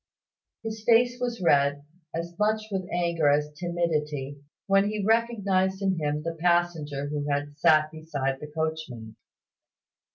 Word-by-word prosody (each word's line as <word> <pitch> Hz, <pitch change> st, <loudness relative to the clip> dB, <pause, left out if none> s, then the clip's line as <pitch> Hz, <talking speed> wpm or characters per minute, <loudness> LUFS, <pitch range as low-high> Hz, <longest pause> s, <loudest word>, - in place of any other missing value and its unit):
His 220 Hz, -1 st, -5 dB
face 245 Hz, +2 st, +4 dB
was 240 Hz, -5 st, -2 dB
red, 145 Hz, -2 st, +3 dB, 0.3 s
as 170 Hz, +1 st, -4 dB
much 215 Hz, +1 st, +2 dB
with 190 Hz, -2 st, -3 dB
anger 170 Hz, -3 st, +1 dB
as 150 Hz, +1 st, +2 dB
timidity, 150 Hz, -4 st, -2 dB, 0.3 s
when 195 Hz, +1 st, +3 dB
he 210 Hz, -2 st, -2 dB
recognised 200 Hz, -4 st, +1 dB
in 190 Hz, -3 st, +1 dB
him 150 Hz, 0 st, -1 dB
the 165 Hz, +1 st, -3 dB
passenger 170 Hz, -5 st, +1 dB
who 145 Hz, 0 st, -3 dB
had 145 Hz, 0 st, -2 dB
sat 155 Hz, 0 st, +4 dB
beside 145 Hz, -4 st, -3 dB
the 150 Hz, -, -7 dB
coachman. 150 Hz, -8 st, -4 dB
165 Hz, 135 wpm, -27 LUFS, 145-195 Hz, 0.3 s, face